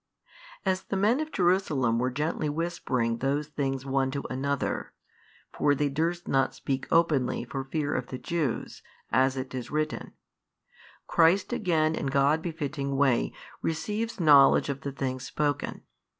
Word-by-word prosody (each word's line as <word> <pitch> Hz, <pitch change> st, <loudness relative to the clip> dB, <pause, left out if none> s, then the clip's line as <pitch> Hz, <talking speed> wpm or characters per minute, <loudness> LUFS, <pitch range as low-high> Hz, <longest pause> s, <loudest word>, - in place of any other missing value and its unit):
As 190 Hz, -1 st, +1 dB
the 195 Hz, -, -3 dB
men 215 Hz, +7 st, +3 dB
of 310 Hz, 0 st, -3 dB
Jerusalem 160 Hz, -, +2 dB
were 125 Hz, +1 st, +1 dB
gently 150 Hz, +3 st, -1 dB
whispering 140 Hz, -8 st, -1 dB
those 140 Hz, +4 st, -1 dB
things 135 Hz, -3 st, -2 dB
one 135 Hz, 0 st, +1 dB
to 140 Hz, +1 st, -4 dB
another 140 Hz, +2 st, -2 dB, 0.6 s
(for 145 Hz, -, +2 dB
they 145 Hz, +1 st, +1 dB
durst 165 Hz, +5 st, -1 dB
not 135 Hz, 0 st, +1 dB
speak 135 Hz, -1 st, -3 dB
openly 150 Hz, -8 st, +2 dB
for 135 Hz, +2 st, -4 dB
fear 145 Hz, +1 st, -2 dB
of 125 Hz, -1 st, -2 dB
the 130 Hz, -, -5 dB
Jews, 155 Hz, -5 st, -3 dB, 0.3 s
as 130 Hz, +2 st, +3 dB
it 130 Hz, 0 st, -5 dB
is 125 Hz, -2 st, -5 dB
written) 155 Hz, +1 st, -2 dB, 0.9 s
Christ 170 Hz, +4 st, +3 dB
again 160 Hz, -5 st, +1 dB
in 140 Hz, -, -2 dB
God 140 Hz, +3 st, +3 dB
befitting 145 Hz, -4 st, -3 dB
way 135 Hz, -4 st, +2 dB, 0.3 s
receives 210 Hz, +8 st, -2 dB
knowledge 145 Hz, -4 st, +6 dB
of 140 Hz, -1 st, -3 dB
the 140 Hz, -, -4 dB
things 130 Hz, -1 st, -3 dB
spoken. 145 Hz, -2 st, -2 dB
145 Hz, 150 wpm, -28 LUFS, 135-165 Hz, 0.9 s, knowledge